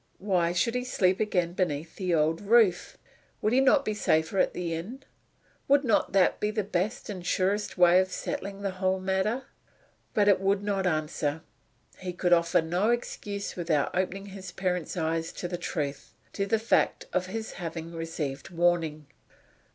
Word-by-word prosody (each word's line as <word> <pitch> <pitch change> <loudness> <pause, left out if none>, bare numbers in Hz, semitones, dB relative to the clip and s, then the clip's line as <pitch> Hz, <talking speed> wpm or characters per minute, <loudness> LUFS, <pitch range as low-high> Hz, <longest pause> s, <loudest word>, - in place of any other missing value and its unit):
Why 180 -4 +1
should 205 +7 +1
he 250 0 -1
sleep 190 -7 +1
again 180 -5 0
beneath 165 -4 -2
the 185 -3 -1
old 160 +1 +1
roof? 205 -3 +3 0.4
Would 215 - +1
he 260 - +5
not 275 +1 +4
be 215 - 0
safer 160 -2 +1
at - - +2
the 175 -2 -3
inn? 220 +12 -6 0.6
Would 280 +1 +4
not 230 -5 +2
that 195 -2 +3
be 210 - 0
the 215 0 -1
best 195 +1 -2
and 190 -4 -6
surest 195 +4 0
way 180 0 +6
of 185 0 0
settling 200 +1 -5
the 195 - -1
whole 185 0 0
matter? 190 +7 0 0.7
But 205 -1 +3
it 195 -2 +5
would 195 +1 +1
not 195 -2 0
answer. 155 -1 -1 0.6
He 180 -1 -5
could 175 0 +2
offer 170 -1 +3
no 180 +7 +1
excuse 205 -4 -3
without 165 -5 0
opening 190 +2 -1
his 190 -2 -9
parent's 180 -1 -2
eyes 165 0 -1
to 175 - -4
the 175 - -4
truth 145 -5 -4 0.2
to 200 -1 -1
the 225 - +2
fact 225 +2 +1
of 185 0 0
his 220 +3 -5
having 165 -1 -6
received 160 -4 -4
warning. 165 -3 +1
185 Hz, 175 wpm, -28 LUFS, 170-205 Hz, 0.7 s, way